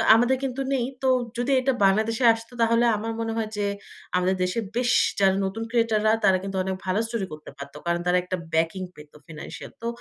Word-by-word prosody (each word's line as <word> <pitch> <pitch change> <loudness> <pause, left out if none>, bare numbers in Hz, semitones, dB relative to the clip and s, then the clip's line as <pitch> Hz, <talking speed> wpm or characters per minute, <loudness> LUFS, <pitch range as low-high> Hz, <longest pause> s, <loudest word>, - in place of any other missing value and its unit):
তো - - +1
আমাদের 245 +3 +3
কিন্তু 265 0 -3
নেই। 250 -3 +1 0.2
তো 265 - +2 0.3
যদি 245 +3 0
এটা 265 +1 +1
বাংলাদেশে 220 +5 +2
আসত 230 0 -8
তাহলে 230 +1 +3
আমার 225 +2 -4
মনে 225 0 -2
হয় 220 -1 -2
যে 205 -1 0 0.5
আমাদের 180 +1 +1
দেশে 180 +5 -1 0.2
বেশ 245 0 +1 0.3
যারা 190 -1 +4
নতুন 195 +4 -3
ক্রিয়েটর 230 -2 +2
রা 215 - +5
তারা 190 -2 +5
কিন্তু 195 0 -5
অনেক 190 0 -2
ভালো 185 +2 +1
স্টোরি 225 -4 -3
করতে 155 0 -9
পারত। 140 0 -9
কারণ 170 0 +1
তারা 180 0 +4
একটা 185 +1 -3 0.2
ব্যাকিং 165 +4 +1
পেত 150 0 -14
ফিন্যান্সিয়াল। 155 -2 -9
তো - - -4
215 Hz, 210 wpm, -25 LUFS, 185-230 Hz, 0.5 s, রা